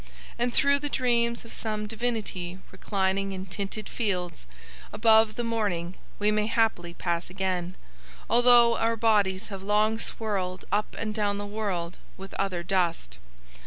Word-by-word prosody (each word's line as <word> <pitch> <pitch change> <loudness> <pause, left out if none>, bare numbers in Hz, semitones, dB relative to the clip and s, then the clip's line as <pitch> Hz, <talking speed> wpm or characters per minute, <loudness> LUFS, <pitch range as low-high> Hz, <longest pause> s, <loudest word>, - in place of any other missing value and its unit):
_ - - -19 0.4
And 240 +1 +1
through 280 +3 +4
the 290 0 -3
dreams 235 -3 +1
of 230 - -11
some 215 -1 -3
divinity 210 -6 -3
reclining 195 0 -1
in 190 0 -5
tinted 200 +3 -4
fields 180 - -3 0.4
above 220 0 +4
the 240 - -2
morning 205 -7 -1 0.2
we 210 +1 +2
may 210 0 +1
haply 220 -7 0
pass 170 -1 -2
again, 185 -1 -2 0.5
although 240 -1 +6
our 230 0 +1
bodies 210 -3 +2
have 195 -2 -6
long 210 +2 +2
swirled 190 -6 -3
up 210 +2 0
and 215 -1 -3
down 205 -2 0
the 205 - -4
world 200 -5 -3 0.2
with 195 +1 -9
other 185 -3 -1
dust. 170 - -1
205 Hz, 150 wpm, -27 LUFS, 185-225 Hz, 0.5 s, although